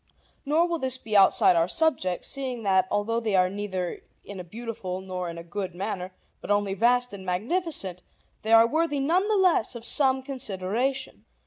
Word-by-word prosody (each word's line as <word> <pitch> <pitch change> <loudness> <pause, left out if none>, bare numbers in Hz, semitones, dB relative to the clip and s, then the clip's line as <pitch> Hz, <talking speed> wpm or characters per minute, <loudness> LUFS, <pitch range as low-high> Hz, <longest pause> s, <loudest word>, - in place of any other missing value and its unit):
Nor 320 +4 +3
will 340 -1 -2
this 260 -2 0
be 220 -4 -5
outside 195 -2 +5
our 165 0 +3
subject, 185 - 0
seeing 255 -4 -4
that, 190 -2 +3
although 205 +3 0
they 220 -4 -1
are 185 0 +3
neither 190 -3 -4 0.2
in 200 -2 -8
a - - -5
beautiful 210 -1 -6
nor 185 -2 -5
in 170 - -7
a 170 - -7
good 185 +1 -5
manner 190 -1 -4 0.3
but - - -9
only 205 -1 +1
vast 245 +3 +2
and 195 -1 -8
magnificent, 195 - -2 0.4
they 220 - -3
are 225 0 +8
worthy 300 +3 0
none 345 +8 +2
the 435 - +2
less 365 - +2
of 235 -1 -8
some 265 0 +2
consideration. 255 +1 -3
215 Hz, 185 wpm, -26 LUFS, 185-265 Hz, 0.4 s, are